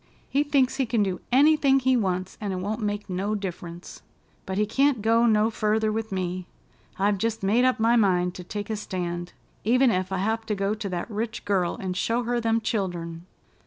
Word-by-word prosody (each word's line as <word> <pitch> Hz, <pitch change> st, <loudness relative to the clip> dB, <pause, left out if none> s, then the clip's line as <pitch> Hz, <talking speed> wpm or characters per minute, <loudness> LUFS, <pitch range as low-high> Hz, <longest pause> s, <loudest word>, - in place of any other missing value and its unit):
He 280 Hz, -, +3 dB
thinks 280 Hz, -3 st, +2 dB
he 265 Hz, -3 st, 0 dB
can 225 Hz, -2 st, +2 dB
do 185 Hz, -2 st, -2 dB
anything 280 Hz, 0 st, +5 dB
he 260 Hz, 0 st, +2 dB
wants, 185 Hz, -4 st, -1 dB
and 205 Hz, -2 st, -2 dB
it -, -, -2 dB
won't 205 Hz, +5 st, -3 dB
make 205 Hz, 0 st, -2 dB
no 195 Hz, +3 st, -1 dB
diff'runce. 175 Hz, -3 st, -7 dB, 0.5 s
But 190 Hz, 0 st, -3 dB
he 210 Hz, -, +3 dB
can't 265 Hz, +1 st, +2 dB
go 230 Hz, +1 st, +4 dB
no 215 Hz, 0 st, +3 dB
further 215 Hz, 0 st, +1 dB
with 220 Hz, 0 st, -3 dB
me. 185 Hz, -1 st, -3 dB, 0.5 s
I've 200 Hz, 0 st, +1 dB
jest 225 Hz, -1 st, -1 dB
made 225 Hz, +6 st, +3 dB
up 255 Hz, -1 st, +2 dB
my 230 Hz, +2 st, +4 dB
mind 180 Hz, -5 st, +2 dB
to 180 Hz, -, -8 dB
take 205 Hz, +4 st, -5 dB
a -, -, 0 dB
stand, 175 Hz, -4 st, -4 dB, 0.3 s
even 250 Hz, +3 st, +4 dB
ef 185 Hz, -1 st, -1 dB
I 190 Hz, -, 0 dB
have 220 Hz, +4 st, 0 dB
to 210 Hz, -, 0 dB
go 195 Hz, +1 st, 0 dB
to 215 Hz, -2 st, -4 dB
that 180 Hz, +5 st, -4 dB
rich 220 Hz, +2 st, -4 dB
girl 190 Hz, -4 st, +1 dB
and 185 Hz, -2 st, -4 dB
show 230 Hz, +6 st, 0 dB
her 240 Hz, 0 st, -1 dB
them 225 Hz, 0 st, +1 dB
childern." 175 Hz, -6 st, -3 dB
210 Hz, 205 wpm, -25 LUFS, 185-230 Hz, 0.5 s, anything